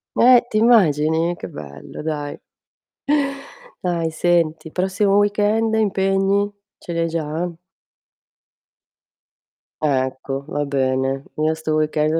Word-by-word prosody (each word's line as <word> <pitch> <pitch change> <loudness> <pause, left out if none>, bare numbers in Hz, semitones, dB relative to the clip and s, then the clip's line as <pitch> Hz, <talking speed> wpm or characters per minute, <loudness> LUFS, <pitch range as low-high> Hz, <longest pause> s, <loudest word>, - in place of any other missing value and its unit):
Eh, 245 0 +7
ti 215 - 0
immagini? 165 -7 +3
Che - - -7
bello 70 -1 -9
dai. 150 -2 -4 1.4
Dai 170 -2 -1
senti, 160 -1 +1
il 160 - -13
prossimo 195 +2 +1
weekend 210 +2 +2
impegni? 195 -1 +1 0.3
Ce - - -9
li 170 - -2
hai 165 - +1
già? 165 +1 -2 2.3
Ecco, 135 -1 -1
va 145 0 -1
bene. 135 0 0
Io 155 +1 +1
sto 160 -1 -2
weekend 155 +1 +1
160 Hz, 110 wpm, -21 LUFS, 150-195 Hz, 2.3 s, Eh